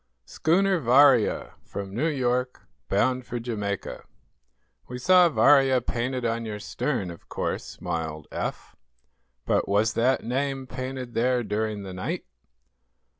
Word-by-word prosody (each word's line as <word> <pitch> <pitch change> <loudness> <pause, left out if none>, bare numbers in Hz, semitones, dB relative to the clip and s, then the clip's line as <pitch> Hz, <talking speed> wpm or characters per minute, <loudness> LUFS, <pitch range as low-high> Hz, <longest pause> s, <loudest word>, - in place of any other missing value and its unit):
"Schooner 190 +3 +2
'Varia,' 130 -2 +4
from 100 -1 -7
New 135 +10 0
York, 125 -3 -1 0.3
bound 125 +6 +1
for 120 0 -5
Jamaica." 105 -4 -4 0.8
"We 125 - -6
saw 180 +6 +5
'Varia' 135 -4 +5
painted 125 +1 -3
on 115 0 -1
your 110 -2 -5
stern, 95 -3 -3
of 85 - -14
course," - - -2
smiled 80 -2 -5
Eph. - - -5 0.7
"But - - +1
was 105 +2 +2
that 125 +3 +2
name 135 +2 -2
painted 130 -1 -6
there 125 +1 +1
during 105 -1 -2
the 95 -1 -7
night?" 90 0 -4
125 Hz, 125 wpm, -26 LUFS, 105-130 Hz, 0.8 s, saw